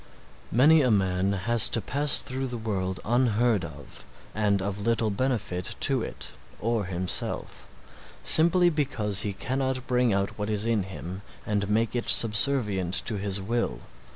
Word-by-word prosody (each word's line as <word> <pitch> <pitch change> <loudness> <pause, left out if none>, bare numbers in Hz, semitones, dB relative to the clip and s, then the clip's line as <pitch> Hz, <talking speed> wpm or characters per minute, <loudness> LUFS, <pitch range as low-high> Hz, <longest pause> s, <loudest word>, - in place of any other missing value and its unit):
Many 150 +7 +5
a 130 - +2
man 95 -2 +1
has 115 +4 +3
to - - 0
pass 140 +6 +2
through 130 +1 -4
the 120 -1 -5
world 95 -4 -3
unheard 120 -3 +2
of 75 -4 -9 0.3
and 105 -2 +1
of 100 +1 -4
little 115 -1 +1
benefit 105 -6 -2
to - - +1
it - - -6 0.3
or 115 -2 -1
himself, 90 0 0 0.5
simply 175 +2 +4
because 110 - -1
he 105 - -2
cannot 130 +4 -2
bring 125 -2 +1
out 100 +1 -1
what 105 +1 -2
is 105 0 0
in 115 -2 +1
him 95 0 -7 0.2
and 105 -1 -1
make 110 +2 0
it 120 - -2
subservient 105 -5 +1
to 105 - -3
his 100 0 -2
will. 100 - -2
105 Hz, 155 wpm, -26 LUFS, 95-125 Hz, 0.5 s, Many